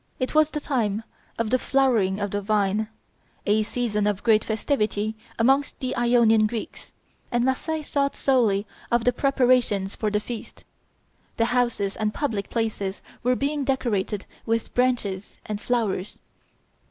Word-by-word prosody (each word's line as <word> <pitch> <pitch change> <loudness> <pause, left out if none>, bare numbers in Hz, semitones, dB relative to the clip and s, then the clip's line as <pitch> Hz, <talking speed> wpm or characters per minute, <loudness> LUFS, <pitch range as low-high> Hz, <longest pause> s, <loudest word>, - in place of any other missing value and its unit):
It 255 - -1
was 310 0 +5
the 305 - -3
time 225 -7 -1 0.3
of 230 -1 -1
the 255 - +3
flowering 235 -9 +2
of 205 -1 -2
the 205 - -1
vine, 210 +1 +1 0.6
a 210 +1 +3
season 215 -2 -1
of 205 -2 -1
great 220 -2 +4
festivity 220 -2 -1 0.2
amongst 270 +4 +2
the 255 -1 -2
Ionian 235 -3 +4
Greeks, 225 0 -6 0.4
and 240 0 +2
Marseilles 305 +4 -2
thought 280 -1 +1
solely 225 -7 +2 0.3
of 235 -1 +3
the 245 - +3
preparations 250 -7 +2
for 215 - -1
the 210 0 +1
feast. 225 +1 -8 0.7
The 230 - +3
houses 240 -5 0
and 215 -1 -1
public 225 -9 -2
places 210 -4 -2 0.2
were 250 +1 +2
being 285 +2 -1
decorated 215 -7 -1 0.2
with 230 0 -1
branches 235 -6 0
and 210 0 -4
flowers. 215 -6 -1
230 Hz, 145 wpm, -25 LUFS, 210-255 Hz, 0.7 s, was